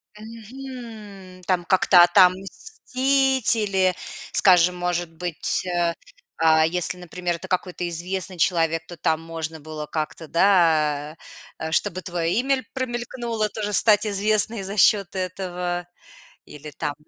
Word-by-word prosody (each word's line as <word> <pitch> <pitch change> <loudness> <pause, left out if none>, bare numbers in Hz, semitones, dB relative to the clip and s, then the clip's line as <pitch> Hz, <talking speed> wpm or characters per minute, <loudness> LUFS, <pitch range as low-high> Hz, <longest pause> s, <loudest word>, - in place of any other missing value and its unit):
Мгм. 220 -4 -11
Там 180 -2 0
как-то 185 -1 +5
отомстить 255 - +2
или, 190 -4 +1 0.4
скажем, 180 -2 +4
может 175 -1 -2
быть, 175 +1 -2
э, 175 -1 0 0.5
а, 160 -1 +4
если, 180 +2 0
например, 180 0 -4
это 190 - -10
какой-то 180 -1 -3
известный 180 +2 -3
человек, 165 -1 +1
то 175 - -9
там 160 +1 0
можно 165 -1 -6
было 155 0 -7
как-то, 155 +1 -5
да, 160 -4 +2 0.5
чтобы 185 +1 0
твое 170 -2 -2
имя 270 +2 +1
ль 260 - -7
промелькнуло 240 -3 -3
тоже 210 -1 -4
стать 210 +1 +4
известной 210 +1 +1
за 195 +2 -5
счет 200 -2 +3
этого 180 -1 -4 0.6
или 150 +1 -11
там 145 +1 -4
185 Hz, 125 wpm, -23 LUFS, 170-210 Hz, 0.6 s, как-то